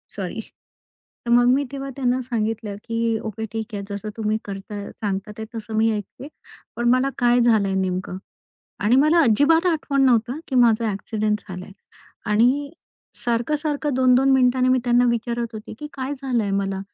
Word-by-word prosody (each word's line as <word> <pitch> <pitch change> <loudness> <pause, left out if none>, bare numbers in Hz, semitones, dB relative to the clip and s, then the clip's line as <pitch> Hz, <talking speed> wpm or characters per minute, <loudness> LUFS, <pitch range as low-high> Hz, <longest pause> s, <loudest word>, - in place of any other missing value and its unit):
Sorry. - - -5 0.9
तर 235 - -1
मग 245 0 +5
मी 280 - +2
तेव्हा 275 0 -5
त्यांना 255 -2 0
सांगितलं, 225 -3 -3
की 230 0 0
ओके 220 +1 -5
ठीक 225 0 -5
आहे 200 - -4
जसं 205 +1 -5
तुम्ही 215 0 0
करताय 200 +1 -7
सांगतात 205 0 -4
ते 220 - -5
तसं 220 0 -6
मी 225 +1 +3
ऐकते, 215 +6 -6 0.5
पण 240 0 +1
मला 255 +2 +3
काय 245 0 +3
झालंय 215 -5 +3
नेमकं? 185 0 -3 0.6
आणि 220 +5 +3
मला 305 +5 +4
अजिबात 290 - +4
आठवण 290 -4 0
नव्हतं, 245 +3 +2
की 265 - -3
माझा 230 -2 +4
ॲक्सिडेंट 210 +1 -2
झालाय 185 +1 -8 0.6
आणि 255 +7 +2 0.5
सारखं-सारखं 290 +5 -1
2-2 255 +1 +4
मिनिटांनी 255 -1 +3
मी 255 - +4
त्यांना 245 0 +4
विचारत 235 0 -2
होते, 215 - -8
की 300 - -6
काय 270 +1 -4
झालंय 240 -6 0
मला, 195 -1 -1
235 Hz, 160 wpm, -22 LUFS, 215-260 Hz, 0.9 s, मग